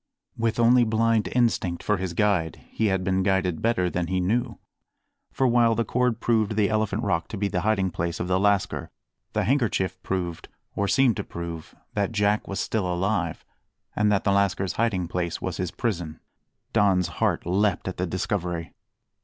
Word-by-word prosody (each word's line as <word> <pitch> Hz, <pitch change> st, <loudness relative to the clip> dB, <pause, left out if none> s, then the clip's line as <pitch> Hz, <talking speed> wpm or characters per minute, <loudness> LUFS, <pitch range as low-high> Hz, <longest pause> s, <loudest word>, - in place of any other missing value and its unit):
With 115 Hz, 0 st, -1 dB
only 120 Hz, +1 st, +6 dB
blind 115 Hz, 0 st, +2 dB
instinct 115 Hz, -8 st, +1 dB
for 105 Hz, -, +1 dB
his 90 Hz, -2 st, -4 dB
guide, 95 Hz, -6 st, 0 dB
he 110 Hz, -, 0 dB
had 95 Hz, -2 st, 0 dB
been 95 Hz, 0 st, +1 dB
guided 95 Hz, -3 st, +1 dB
better 110 Hz, -6 st, +1 dB
than 90 Hz, -1 st, -2 dB
he 95 Hz, +1 st, 0 dB
knew; 110 Hz, +7 st, 0 dB, 0.7 s
for 135 Hz, -, 0 dB
while 120 Hz, -2 st, +4 dB
the 115 Hz, +1 st, 0 dB
cord 125 Hz, 0 st, 0 dB
proved 110 Hz, -2 st, +1 dB
the 105 Hz, -1 st, +2 dB
Elephant 110 Hz, 0 st, 0 dB
Rock 85 Hz, -1 st, 0 dB
to 110 Hz, -, -6 dB
be 100 Hz, +1 st, 0 dB
the 90 Hz, -2 st, -1 dB
hiding 100 Hz, -4 st, +1 dB
place 85 Hz, 0 st, -3 dB
of 85 Hz, -, -2 dB
the 90 Hz, 0 st, +2 dB
lascar, 100 Hz, -1 st, +1 dB, 0.4 s
the -, -, +1 dB
handkerchief 110 Hz, -6 st, 0 dB
proved, 90 Hz, -3 st, -3 dB, 0.3 s
or 100 Hz, -, 0 dB
seemed 130 Hz, -2 st, +3 dB
to -, -, -2 dB
prove, 85 Hz, -2 st, -7 dB, 0.2 s
that 100 Hz, +1 st, -1 dB
Jack 105 Hz, 0 st, +1 dB
was 100 Hz, -, -3 dB
still 100 Hz, -5 st, -1 dB
alive 90 Hz, -1 st, -1 dB, 0.5 s
and 105 Hz, 0 st, +2 dB
that 100 Hz, -1 st, +2 dB
the 100 Hz, -, +2 dB
lascar's 100 Hz, -1 st, +1 dB
hiding 100 Hz, -6 st, 0 dB
place 85 Hz, -1 st, -2 dB
was -, -, -4 dB
his 90 Hz, -2 st, -2 dB
prison. 85 Hz, -6 st, -3 dB, 0.5 s
Don's 95 Hz, -5 st, +3 dB
heart -, -, +1 dB
leapt 95 Hz, +2 st, +1 dB
at 95 Hz, -, -4 dB
the 90 Hz, -, -1 dB
discovery. 90 Hz, -2 st, -3 dB
100 Hz, 180 wpm, -25 LUFS, 90-110 Hz, 0.7 s, only